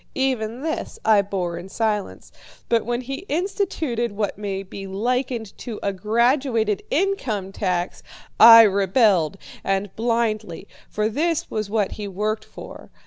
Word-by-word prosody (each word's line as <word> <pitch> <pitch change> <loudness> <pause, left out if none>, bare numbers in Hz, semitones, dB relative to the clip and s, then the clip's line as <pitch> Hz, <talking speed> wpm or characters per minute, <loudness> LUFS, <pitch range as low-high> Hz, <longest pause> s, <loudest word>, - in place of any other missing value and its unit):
Even 255 -2 -1
this 320 0 -3
I 215 -2 +5
bore 180 -4 -3
in 180 +2 -10
silence, 210 -1 -2 0.4
but 230 -2 +1
when 240 +1 -1
he 270 +6 -6
instituted 310 - -1
what 205 -1 -2
may 195 -1 -4
be 195 +1 -8
likened 235 +2 -2
to 230 -4 -6
a 200 - 0
graduated 230 +1 +1
income 270 - -1
tax, 180 -3 -2 0.4
I 230 0 +11
rebelled, 195 - +3 0.3
and 195 0 -1
blindly, 220 -5 -1 0.2
for 215 0 0
this 315 +8 -1
was 215 -2 -3
what 210 -2 0
he 210 -1 -6
worked 210 +3 -2
for. - - -11
215 Hz, 140 wpm, -22 LUFS, 195-240 Hz, 0.4 s, I